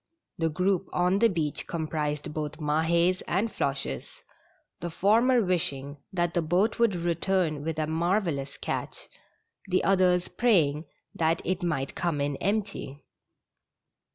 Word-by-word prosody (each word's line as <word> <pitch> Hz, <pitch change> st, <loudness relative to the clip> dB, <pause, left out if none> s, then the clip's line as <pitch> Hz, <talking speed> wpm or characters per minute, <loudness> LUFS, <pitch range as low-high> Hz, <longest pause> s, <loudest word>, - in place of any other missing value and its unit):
The 165 Hz, -1 st, +2 dB
group 180 Hz, +4 st, 0 dB
on 180 Hz, +2 st, +2 dB
the 230 Hz, -, +6 dB
beach 160 Hz, -6 st, -2 dB
comprised 155 Hz, -2 st, -3 dB
both 155 Hz, 0 st, -4 dB
Mahds 165 Hz, +4 st, +2 dB
and 215 Hz, +3 st, 0 dB
Floches, 140 Hz, 0 st, -3 dB, 0.6 s
the 170 Hz, -, -4 dB
former 230 Hz, +8 st, +3 dB
wishing 145 Hz, -6 st, -1 dB
that 175 Hz, -2 st, 0 dB
the 175 Hz, -, +2 dB
boat 180 Hz, +9 st, +1 dB
would 230 Hz, -5 st, +3 dB
return 170 Hz, -2 st, 0 dB
with 160 Hz, 0 st, -3 dB
a 155 Hz, -, 0 dB
marvellous 165 Hz, -3 st, -1 dB
catch, -, -, -4 dB, 0.6 s
the 185 Hz, 0 st, +1 dB
others 180 Hz, -2 st, +3 dB
praying 165 Hz, -10 st, +2 dB, 0.3 s
that 165 Hz, 0 st, +1 dB
it 185 Hz, 0 st, -1 dB
might 150 Hz, -6 st, -1 dB
come 170 Hz, -4 st, -1 dB
in 140 Hz, 0 st, 0 dB
empty. 200 Hz, -9 st, -2 dB
170 Hz, 130 wpm, -27 LUFS, 150-185 Hz, 0.6 s, the